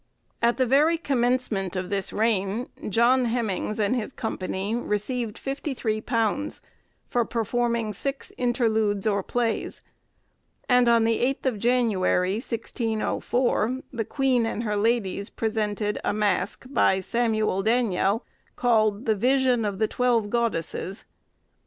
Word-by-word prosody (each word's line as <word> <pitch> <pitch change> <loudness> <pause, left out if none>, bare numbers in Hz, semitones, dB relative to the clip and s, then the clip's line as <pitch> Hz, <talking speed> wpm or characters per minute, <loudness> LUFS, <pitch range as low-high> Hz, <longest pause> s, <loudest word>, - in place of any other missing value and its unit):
At 235 +1 +3
the 260 - +3
very 295 +7 +4
commencement 245 - 0
of 185 +1 -3
this 195 -1 -1
reign, 215 +1 0 0.2
John 245 +4 +4
Hemynges 220 -3 -1
and 210 +3 +2
his 235 +1 -3
company 200 -3 -3
received 230 0 -2
£53 245 -2 -2 0.5
for 240 - +1
performing 230 0 -1
six 275 +7 -4
interludes 220 -5 +1
or 200 -2 +2
plays; 230 +3 -2 0.8
and 250 -1 +4
on 230 -1 +5
the 225 0 +2
8th 270 +3 0
of 245 -6 0
January, 205 -5 +2
1604, 235 +1 -1
the 230 -2 -1
queen 255 -1 +1
and 225 - -3
her 210 -2 -1
ladies 205 -2 0
presented 210 -2 -1
a - - 0
mask, 205 +1 0
by 190 -8 +3
Samuel 215 -2 0
Daniell, 220 -2 +2 0.3
called 215 -2 +2
the 220 - +3
'Vision 250 +2 +2
of 205 -2 -2
the 220 +1 +1
Twelve 235 -4 +1
Goddesses. 200 -4 -2
225 Hz, 125 wpm, -25 LUFS, 210-245 Hz, 0.8 s, on